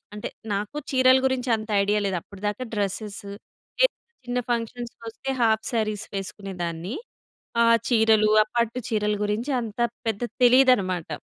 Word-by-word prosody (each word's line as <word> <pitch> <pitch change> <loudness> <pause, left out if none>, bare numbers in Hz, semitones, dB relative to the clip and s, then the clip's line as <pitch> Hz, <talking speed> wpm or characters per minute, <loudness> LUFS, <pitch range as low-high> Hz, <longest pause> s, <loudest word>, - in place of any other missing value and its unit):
అంటే 210 - -5 0.3
నాకు 205 +7 -3 0.2
చీరల 260 0 +6
గురించి 260 -1 -1
అంత 215 0 -8
ఐడియా 205 +1 +2
లేదు 190 -2 -1
అప్పటిదాకా 205 +4 -4
డ్రెసెస్ 205 +1 -2 0.6
ఎ - - +7 0.4
చిన్న 245 0 -2
ఫంక్షన్స్‌కోస్తే 235 +1 -4
హాఫ్ 220 -1 +3
సరీస్ 215 -1 -1
వేసుకునేదాన్ని. 185 -1 -5 0.7
ఆ - - +5 0.2
చీరలు, 220 -2 +4
ఆ - - -16
పట్టు 235 +1 +1
చీరలు 210 -2 0
గురించి 220 +7 -1
అంత 225 -1 -7 0.3
పెద్ద 220 -1 -1 0.2
తెలీదన్నమాట. 240 -10 +4
215 Hz, 130 wpm, -25 LUFS, 205-240 Hz, 0.7 s, ఎ